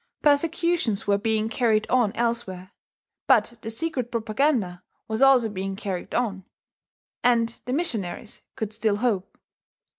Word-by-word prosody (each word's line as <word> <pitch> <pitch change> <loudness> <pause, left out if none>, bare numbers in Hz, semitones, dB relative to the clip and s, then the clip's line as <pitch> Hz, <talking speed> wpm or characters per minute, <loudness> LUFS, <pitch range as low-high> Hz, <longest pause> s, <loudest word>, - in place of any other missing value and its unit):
Persecutions 300 - +2
were 200 0 +2
being 220 +1 0
carried 225 -2 +1
on 245 -5 +3
elsewhere; 230 -6 -2 0.6
but 235 - +3
the 225 - -5
secret 255 0 -3
propaganda 220 -5 0 0.3
was 220 +1 -2
also 270 -4 +6
being 195 -2 -4
carried 195 -4 -5
on, 200 -6 -1 0.8
and 230 -1 +2
the 250 - -2
missionaries 225 - -3
could 220 -1 -4
still 220 -2 +1
hope. 205 -4 -1
225 Hz, 125 wpm, -25 LUFS, 205-250 Hz, 0.8 s, also